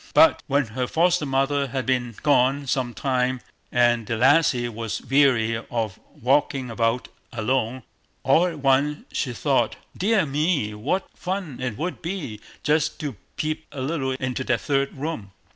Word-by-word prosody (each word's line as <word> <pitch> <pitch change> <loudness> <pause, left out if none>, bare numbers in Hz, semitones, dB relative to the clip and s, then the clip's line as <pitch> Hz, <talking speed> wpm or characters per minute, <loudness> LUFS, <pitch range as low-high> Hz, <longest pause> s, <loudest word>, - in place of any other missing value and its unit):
But 320 0 +6
when 140 -1 +2
her 125 +3 -3
foster 170 0 +2
mother 135 +1 +1
had 130 0 -3
been 125 -3 0
gone 140 0 +3
some 130 -2 -1
time, 130 -1 0 0.3
and 120 -2 +3
the 115 - -1
lassie 130 -1 +4
was 115 -1 -4
weary 125 -4 +3
of 110 -4 -2 0.2
walking 135 0 +1
about 115 +2 0 0.2
alone, 120 +1 -1 0.4
all 160 +7 +4
at 170 -3 -5
once 140 +2 +2
she 130 - -1
thought, 120 - +1 0.2
"Dear 205 -1 +2
me, 145 -6 0
what 130 - -1
fun 180 -7 -4
it 125 -4 -3
would 175 +5 -3
be 165 - -4 0.2
just 150 0 +1
to 145 -6 -4 0.2
peep 155 +1 -2
a 140 - -7
little 135 -1 -1
into 130 -1 -3
that 120 -2 +1
third 140 -1 0
room." 130 -10 -5
135 Hz, 155 wpm, -24 LUFS, 120-150 Hz, 0.4 s, But